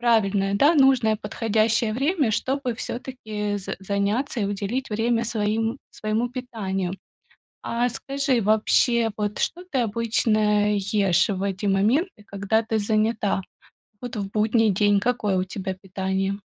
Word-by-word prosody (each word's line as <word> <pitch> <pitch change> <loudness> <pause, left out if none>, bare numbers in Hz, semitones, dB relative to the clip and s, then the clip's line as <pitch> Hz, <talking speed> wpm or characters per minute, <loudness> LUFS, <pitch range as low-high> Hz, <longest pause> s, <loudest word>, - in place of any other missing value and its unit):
правильное, 200 -4 +2
да, 285 +11 +4
нужное 260 -6 +4
подходящее 220 +1 0
время, 275 - +1
чтобы 260 +2 -1
всё-таки 220 -5 -4
з 195 - -5
заняться 205 +7 -1
и 200 - +1
уделить 205 +6 -3
время 230 +2 +1
своим 225 +2 -1
своему 220 +3 -2
питанию. 195 -8 -3 0.7
А 240 +1 0
скажи, 275 0 -1
вообще, 225 +2 +3
вот 210 0 -2
что 355 - -2
ты 265 - +1
обычно 215 -2 +1
ешь 200 -1 +2
в 195 -1 -2
эти 200 +1 -2
моменты, 215 - +1
когда 200 +3 0
ты 220 0 -1
занята? 215 -1 +1 0.6
Вот 245 -2 -6
в 195 -2 -4
будний 220 +1 +2
день 205 +1 +3
какое 210 -4 0
у 185 - +1
тебя 190 0 -5
питание? 190 +1 -3
215 Hz, 135 wpm, -24 LUFS, 200-235 Hz, 0.7 s, да